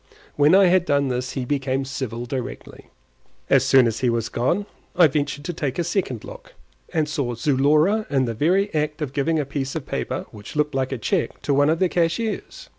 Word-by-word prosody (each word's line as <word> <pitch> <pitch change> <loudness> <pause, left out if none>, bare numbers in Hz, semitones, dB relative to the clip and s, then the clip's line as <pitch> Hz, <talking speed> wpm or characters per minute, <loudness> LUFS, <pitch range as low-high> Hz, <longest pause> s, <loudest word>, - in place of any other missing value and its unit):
When 150 +4 +5
I 195 0 +7
had 180 0 +3
done 140 -3 +1
this 125 0 -3
he 130 -2 -3
became 135 0 -1
civil 120 -3 -4
directly. 130 +1 -6 0.6
As - - +5
soon 130 -2 +5
as 115 -1 -1
he 125 - +1
was 115 -1 -1
gone 170 +12 0 0.3
I 175 - +7
ventured 145 -1 -1
to 175 - -3
take 140 -5 -3
a 175 - +1
second 170 - -2
look, - - -12 0.4
and 155 -2 0
saw 135 -5 -2
Zulora 150 - +2
in 135 -2 +2
the 115 - -2
very 180 - +1
act 150 0 -1
of 135 -2 -5
giving 155 +3 +1
a 150 - 0
piece 135 0 -4
of 155 - -4
paper - - -3
which 105 +4 -11
looked 150 0 0
like 135 0 -1
a 130 - -2
cheque 170 - -1
to 145 - +1
one 145 +2 +4
of 160 - +2
the 185 - +2
cashiers. 175 +6 -2
145 Hz, 210 wpm, -23 LUFS, 130-165 Hz, 0.6 s, I